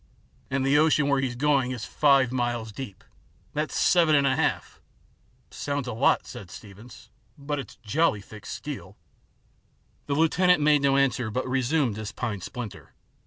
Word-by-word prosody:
And 135 Hz, 0 st, 0 dB
the 140 Hz, +2 st, +4 dB
ocean 150 Hz, -2 st, +3 dB
where 140 Hz, -1 st, +2 dB
he's 125 Hz, -2 st, -2 dB
going 135 Hz, -1 st, +2 dB
is 125 Hz, -3 st, -5 dB
five 135 Hz, -4 st, +3 dB
miles 120 Hz, -3 st, -2 dB
deep. 105 Hz, -3 st, -8 dB, 0.5 s
That's 155 Hz, +1 st, -2 dB
seven 165 Hz, -4 st, +4 dB
and 140 Hz, -1 st, +3 dB
a 135 Hz, -1 st, +2 dB
half" -, -, -2 dB, 0.4 s
" 120 Hz, +5 st, -38 dB
Sounds 140 Hz, -2 st, -3 dB
a 120 Hz, -, -3 dB
lot," 110 Hz, -, +2 dB
said 100 Hz, -, -9 dB
Steevens, 110 Hz, +5 st, -13 dB, 0.2 s
" -, -, -38 dB
but 145 Hz, 0 st, -3 dB
it's 130 Hz, -, -8 dB
jolly 130 Hz, 0 st, +1 dB
thick 105 Hz, +1 st, -12 dB
steel." -, -, -7 dB, 1.1 s
The 140 Hz, -, 0 dB
lieutenant 180 Hz, +3 st, +3 dB
made 150 Hz, -1 st, +4 dB
no 140 Hz, -1 st, +3 dB
answer, 130 Hz, -4 st, +1 dB
but 130 Hz, +4 st, -3 dB
resumed 130 Hz, -2 st, 0 dB
his 110 Hz, -1 st, -5 dB
pine 110 Hz, -6 st, -4 dB
splinter. 120 Hz, +2 st, -8 dB
130 Hz, 165 wpm, -26 LUFS, 120-145 Hz, 1.1 s, the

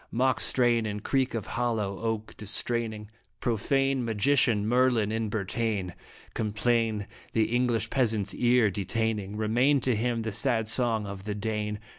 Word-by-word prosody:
Mock 130 Hz, +2 st, +1 dB
strain 120 Hz, -3 st, +2 dB
and 105 Hz, 0 st, -5 dB
creak 135 Hz, -3 st, 0 dB
of 110 Hz, -, -3 dB
hollow 110 Hz, -5 st, -2 dB
oak 110 Hz, -1 st, -3 dB
distraining 110 Hz, 0 st, -1 dB, 0.3 s
Profane 135 Hz, +3 st, 0 dB
magician 115 Hz, -1 st, +2 dB
Merlin 120 Hz, -3 st, +2 dB
in 110 Hz, -1 st, -1 dB
Bretagne. 100 Hz, -2 st, -2 dB, 0.4 s
Complain 110 Hz, 0 st, 0 dB, 0.3 s
the 115 Hz, +1 st, +1 dB
English 120 Hz, -2 st, 0 dB
peasant's 110 Hz, -7 st, +1 dB
ear 120 Hz, -3 st, +3 dB
detaining, 105 Hz, +1 st, -2 dB
Remain 120 Hz, +7 st, +2 dB
to 125 Hz, -1 st, +1 dB
him 115 Hz, +1 st, -1 dB
the 110 Hz, -, -3 dB
sad 115 Hz, 0 st, +1 dB
song 115 Hz, -2 st, +2 dB
of 100 Hz, -1 st, -7 dB
the 105 Hz, -1 st, -3 dB
Dane. 105 Hz, 0 st, -2 dB
110 Hz, 140 wpm, -28 LUFS, 105-120 Hz, 0.4 s, ear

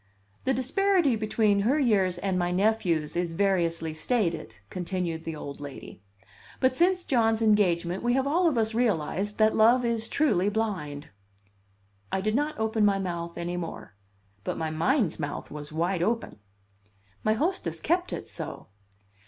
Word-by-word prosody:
"The 265 Hz, -, +2 dB
disparity 315 Hz, +2 st, +2 dB
between 215 Hz, -1 st, +2 dB
her 240 Hz, +9 st, +2 dB
years 195 Hz, -9 st, +2 dB
and 185 Hz, 0 st, -1 dB
my 175 Hz, 0 st, 0 dB
nephew's 180 Hz, -5 st, +1 dB
is 175 Hz, -1 st, -1 dB
variously 170 Hz, -4 st, 0 dB
stated," 165 Hz, -, -1 dB, 0.2 s
continued 175 Hz, -2 st, -3 dB
the 165 Hz, -, -4 dB
old 140 Hz, -2 st, -7 dB
lady. 140 Hz, -7 st, -9 dB, 0.6 s
"But 260 Hz, 0 st, +2 dB
since 360 Hz, +4 st, +3 dB
John's 225 Hz, -4 st, +2 dB
engagement 185 Hz, -5 st, +2 dB
we 240 Hz, 0 st, +1 dB
have 265 Hz, +1 st, +1 dB
all 340 Hz, +5 st, +2 dB
of 275 Hz, -, -2 dB
us 220 Hz, 0 st, +1 dB
realized 205 Hz, -3 st, 0 dB
that 215 Hz, 0 st, +4 dB
love 240 Hz, +3 st, +5 dB
is 230 Hz, -1 st, -1 dB
truly 205 Hz, -12 st, +2 dB
blind." 190 Hz, -10 st, -3 dB, 1.0 s
I -, -, 0 dB
did 215 Hz, +3 st, 0 dB
not 295 Hz, +5 st, 0 dB
open 220 Hz, 0 st, 0 dB
my 200 Hz, -1 st, +4 dB
mouth 170 Hz, -3 st, -4 dB
any 175 Hz, +1 st, -3 dB
more; 165 Hz, -, -6 dB, 0.5 s
but -, -, -3 dB
my 160 Hz, -1 st, -2 dB
mind's 185 Hz, -, +1 dB
mouth 145 Hz, -1 st, -5 dB
was 150 Hz, 0 st, -8 dB
wide 170 Hz, +3 st, 0 dB
open. 230 Hz, -, -1 dB, 0.8 s
My 215 Hz, -, +3 dB
hostess 340 Hz, -, -1 dB
kept 355 Hz, +3 st, 0 dB
it -, -, -5 dB
so. -, -, -5 dB
205 Hz, 155 wpm, -27 LUFS, 170-235 Hz, 1.0 s, love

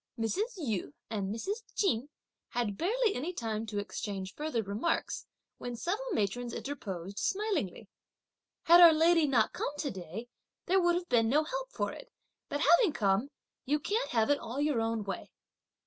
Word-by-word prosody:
Mrs. 390 Hz, -, -1 dB
Yu 215 Hz, -, -3 dB, 0.2 s
and 200 Hz, -3 st, -2 dB
Mrs. 395 Hz, -, -3 dB
Ch'in 265 Hz, -, +1 dB, 0.4 s
had 230 Hz, -5 st, -1 dB
barely 430 Hz, -, +1 dB
any 305 Hz, +8 st, -3 dB
time 225 Hz, -5 st, -3 dB
to 210 Hz, -1 st, -4 dB
exchange 200 Hz, -1 st, -4 dB
any -, -, -35 dB
further 300 Hz, -7 st, -1 dB
remarks, 210 Hz, +12 st, -2 dB, 0.3 s
when 245 Hz, -1 st, -5 dB
several 415 Hz, -, -2 dB
matrons 240 Hz, -, -1 dB
interposed, 200 Hz, -9 st, -5 dB
smilingly: 380 Hz, -, -1 dB, 0.8 s
"Had 345 Hz, +1 st, +8 dB
our 335 Hz, -2 st, +10 dB
lady 325 Hz, 0 st, +4 dB
not 240 Hz, -6 st, +2 dB
come -, -, -2 dB
to 290 Hz, -2 st, -2 dB
day, 190 Hz, +5 st, -7 dB, 0.4 s
there 380 Hz, +2 st, +3 dB
would 345 Hz, 0 st, +3 dB
have 350 Hz, 0 st, -2 dB
been 230 Hz, -2 st, +3 dB
no 300 Hz, +5 st, +4 dB
help -, -, -4 dB
for -, -, -2 dB
it, -, -, -11 dB, 0.4 s
but 290 Hz, -, -2 dB
having 345 Hz, +2 st, +5 dB
come, 200 Hz, +5 st, +1 dB, 0.3 s
you 295 Hz, +3 st, +1 dB
can't 435 Hz, -, -1 dB
have 225 Hz, +2 st, +2 dB
it 290 Hz, -, +3 dB
all 245 Hz, +5 st, -5 dB
your 290 Hz, -5 st, +2 dB
own 225 Hz, -1 st, -1 dB
way." 195 Hz, -1 st, -5 dB
255 Hz, 170 wpm, -31 LUFS, 215-345 Hz, 0.8 s, our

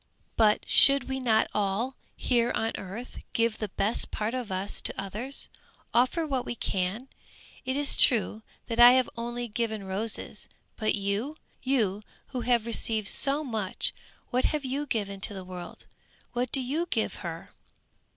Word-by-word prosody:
"But 215 Hz, -2 st, +3 dB
should 275 Hz, -2 st, +6 dB
we 265 Hz, 0 st, -2 dB
not 225 Hz, -4 st, +3 dB
all, 210 Hz, +6 st, 0 dB, 0.2 s
here 240 Hz, -2 st, +1 dB
on 225 Hz, 0 st, 0 dB
earth, 200 Hz, +6 st, -7 dB
give 230 Hz, -1 st, +1 dB
the 215 Hz, -, -3 dB
best 205 Hz, +4 st, +1 dB
part 215 Hz, +2 st, -2 dB
of 250 Hz, -5 st, -4 dB
us 190 Hz, +2 st, -1 dB
to -, -, 0 dB
others? 215 Hz, +8 st, -3 dB, 0.5 s
Offer 255 Hz, +8 st, +3 dB
what 265 Hz, -4 st, -1 dB
we 240 Hz, -, -4 dB
can! 195 Hz, +4 st, -2 dB, 0.6 s
It 260 Hz, +1 st, -1 dB
is 290 Hz, 0 st, +4 dB
true, 220 Hz, -2 st, +4 dB, 0.2 s
that 230 Hz, 0 st, -3 dB
I 240 Hz, +1 st, +10 dB
have 255 Hz, -1 st, +3 dB
only 240 Hz, +1 st, -3 dB
given 220 Hz, -2 st, -2 dB
roses 200 Hz, +4 st, -1 dB, 0.3 s
but 215 Hz, -1 st, +1 dB
you? 205 Hz, +9 st, -2 dB, 0.2 s
You 220 Hz, -7 st, +1 dB, 0.3 s
who 255 Hz, -2 st, -3 dB
have 235 Hz, -1 st, +2 dB
received 225 Hz, -3 st, -1 dB
so 280 Hz, +2 st, +2 dB
much, 220 Hz, -8 st, -2 dB, 0.4 s
what 250 Hz, +1 st, +2 dB
have 300 Hz, -2 st, 0 dB
you 280 Hz, +3 st, -2 dB
given 200 Hz, -5 st, -2 dB
to 205 Hz, -, -1 dB
the 190 Hz, -1 st, -7 dB
world? 180 Hz, -1 st, -9 dB, 0.5 s
What 245 Hz, 0 st, -1 dB
do 270 Hz, -, +1 dB
you 300 Hz, +7 st, -1 dB
give 225 Hz, -, -1 dB
her?" 170 Hz, -4 st, -7 dB
230 Hz, 160 wpm, -28 LUFS, 205-255 Hz, 0.6 s, I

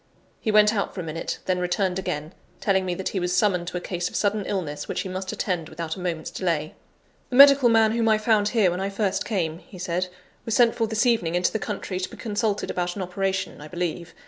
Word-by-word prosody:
He 220 Hz, -, -1 dB
went 210 Hz, 0 st, +5 dB
out 200 Hz, -2 st, -2 dB
for 185 Hz, -, -3 dB
a -, -, -6 dB
minute, 165 Hz, 0 st, -4 dB
then 185 Hz, -1 st, 0 dB
returned 180 Hz, +1 st, 0 dB
again, 155 Hz, -2 st, -4 dB, 0.3 s
telling 190 Hz, -2 st, +1 dB
me 180 Hz, -, -1 dB
that 190 Hz, -, -3 dB
he 195 Hz, -, -2 dB
was 180 Hz, 0 st, 0 dB
summoned 180 Hz, -5 st, +2 dB
to 180 Hz, -, -3 dB
a -, -, -1 dB
case 175 Hz, 0 st, -3 dB
of -, -, -11 dB
sudden 205 Hz, -1 st, 0 dB
illness 150 Hz, -7 st, -3 dB
which -, -, -2 dB
he 190 Hz, -, -5 dB
must 185 Hz, +1 st, -4 dB
attend 175 Hz, -5 st, -2 dB
without 165 Hz, -1 st, -4 dB
a -, -, -9 dB
moment's 170 Hz, -3 st, -3 dB
delay. 165 Hz, -4 st, -1 dB, 0.6 s
"The 245 Hz, -, -3 dB
medical 275 Hz, -2 st, +8 dB
man 225 Hz, -1 st, +5 dB
whom 230 Hz, 0 st, +1 dB
I 215 Hz, -, +5 dB
found 215 Hz, -1 st, +2 dB
here 210 Hz, -5 st, +3 dB
when 180 Hz, -, -3 dB
I 195 Hz, -, -1 dB
first 200 Hz, -1 st, -1 dB
came," 170 Hz, -6 st, -1 dB
he 185 Hz, -, -14 dB
said, 180 Hz, +1 st, -1 dB, 0.4 s
"was 225 Hz, -, -1 dB
sent 235 Hz, -2 st, +5 dB
for 225 Hz, -2 st, 0 dB
this 220 Hz, +3 st, +1 dB
evening 200 Hz, -9 st, +2 dB
into 180 Hz, 0 st, +2 dB
the 220 Hz, -, 0 dB
country, 195 Hz, -2 st, -4 dB
to 185 Hz, -, -3 dB
be -, -, -12 dB
consulted 210 Hz, -1 st, -1 dB
about 175 Hz, 0 st, -2 dB
an 195 Hz, -, -3 dB
operation, 190 Hz, -1 st, -2 dB
I 150 Hz, -, -8 dB
believe. 175 Hz, 0 st, -4 dB
190 Hz, 245 wpm, -25 LUFS, 175-210 Hz, 0.6 s, medical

